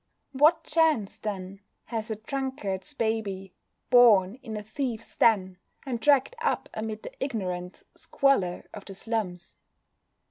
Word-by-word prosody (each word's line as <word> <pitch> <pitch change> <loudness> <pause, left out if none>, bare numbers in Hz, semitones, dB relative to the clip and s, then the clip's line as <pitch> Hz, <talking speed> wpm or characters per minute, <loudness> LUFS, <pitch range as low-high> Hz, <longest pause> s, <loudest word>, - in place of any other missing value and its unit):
What 300 +5 +4
chance, 305 -10 +1
then, 195 -2 -5 0.3
has 225 -1 -4
a 220 - -1
drunkard's 260 0 -4
baby, 210 -5 -2 0.4
born 230 -3 +6
in 220 -5 -6
a 210 - -6
thieves' 230 0 -4
den, 190 -5 +3 0.3
and 250 -4 -3
dragged 285 - +3
up 465 - 0
amid 220 0 -5
the - - -8
ignorant 185 -8 -4
squalor 200 -11 +1
of 205 - -8
the 195 - -8
slums? 195 -5 -4
220 Hz, 130 wpm, -27 LUFS, 195-265 Hz, 0.4 s, born